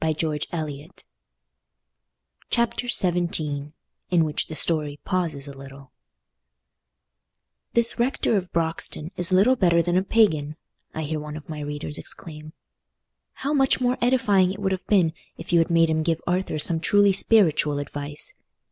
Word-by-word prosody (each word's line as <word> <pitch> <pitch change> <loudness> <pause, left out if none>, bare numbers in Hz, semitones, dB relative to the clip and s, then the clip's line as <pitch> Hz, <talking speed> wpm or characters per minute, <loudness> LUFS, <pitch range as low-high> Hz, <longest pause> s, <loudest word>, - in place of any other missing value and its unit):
Book 155 -1 -1
Second 155 0 -4 1.5
Chapter 235 +1 0
XVII 165 -8 0 0.4
In 175 -2 +3
Which 150 -1 -2
the 155 - -7
Story 150 -3 0
Pauses 165 -6 -1
a 140 - -9
Little 135 0 -12 1.8
"This 235 0 +3
Rector 240 -2 +1
of 185 -3 -2
Broxton 165 -1 -3
is 175 +1 +2
little 200 +8 +5
better 170 -7 +3
than 175 +1 +1
a - - +4
pagan!" 160 -9 +2 0.4
I 160 - -3
hear 155 +1 -3
one 150 0 -7
of 155 - -12
my 155 -2 -6
readers 145 0 -4
exclaim. 155 -1 -8 0.9
"How 290 - +1
much 270 -2 +3
more 250 0 0
edifying 215 -7 +3
it 195 - -6
would 195 -1 -1
have 190 -1 -4
been 180 -6 +3 0.2
if 170 +2 -7
you 170 - +6
had 165 - +2
made 165 -1 +3
him 160 0 +1
give 165 0 0
Arthur 180 -2 -1
some 165 +2 +3
truly 205 +4 +4
spiritual 170 -8 +3
advice! 145 +1 -5
165 Hz, 150 wpm, -24 LUFS, 150-190 Hz, 1.8 s, you